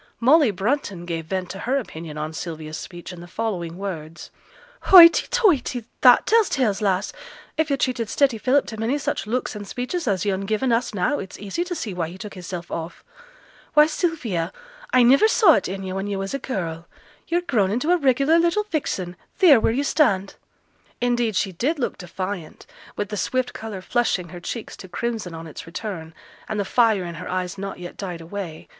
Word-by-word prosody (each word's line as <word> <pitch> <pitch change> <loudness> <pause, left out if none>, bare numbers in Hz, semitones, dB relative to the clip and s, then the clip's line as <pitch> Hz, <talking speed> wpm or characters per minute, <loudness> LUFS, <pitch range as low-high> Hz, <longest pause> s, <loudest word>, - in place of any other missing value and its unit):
Molly 280 +3 +5
Brunton 200 -2 -2
gave 165 -2 -4
vent 185 0 -3
to 195 - -7
her 255 +7 0
opinion 160 - -6
on 155 +1 -4
Sylvia's 160 -2 -6
speech 175 +1 -9
in 175 - -10
the 175 - -10
following 175 -5 -3
words: 170 -5 -6 0.5
'Hoighty 340 -3 +9
toighty! 335 - +2 0.2
That 250 -2 +7
tells 450 -2 +4
tales, 220 -7 0
lass. 195 -1 0 0.4
If 315 0 0
yo' 280 - +2
treated 245 -5 -1
steady 265 -6 +2
Philip 265 +4 +3
to 220 - -7
many 235 +6 0
such 280 - -3
looks 245 0 -2
an' 205 -1 -6
speeches 250 - -4
as 195 -2 0
yo'n 195 -1 -1
given 220 +4 0
us 230 -1 0
now, 190 +10 +1
it's 190 - -8
easy 205 - -3
t' 355 0 -4
see 220 - -4
why 170 -2 -2
he 180 - -10
took 205 +2 -8
hisself 175 -1 -7
off. 165 +1 -6 0.7
Why, 300 0 +8
Sylvia, 275 - -1 0.4
I 250 - +5
niver 275 - +6
saw 440 -1 +6
it 195 - +1
in 195 +1 -5
yo' 185 -1 -4
when 195 +1 -3
yo' 200 -1 -2
was 195 +3 -4
a 275 - -1
girl; 170 -10 -4 0.4
yo're 345 +1 +1
grown 230 - +1
into 250 - 0
a 360 - +5
regular 280 +2 +3
little 345 +5 +2
vixen, 185 - -2 0.2
theere 320 - +7
wheere 220 - +2
yo' 280 - +1
stand!' 200 -11 +2 0.7
Indeed 240 -3 +1
she 195 +1 +1
did 265 - -1
look 255 - -3
defiant, 185 -1 -6 0.3
with 205 - -3
the 210 - -4
swift 255 +4 -1
colour 215 -4 -6
flushing 195 -7 0
her 175 - -8
cheeks 225 +6 -6
to 185 - -10
crimson 215 -2 -4
on 165 0 -8
its 160 0 -9
return, 165 -3 -6 0.3
and 215 -1 -2
the 200 - 0
fire 220 -3 +3
in 170 -1 -5
her - - -6
eyes 185 +1 -3
not 195 0 -5
yet 175 0 -9
died 180 -4 -5
away. 170 -2 -7
205 Hz, 200 wpm, -23 LUFS, 180-255 Hz, 0.7 s, Hoighty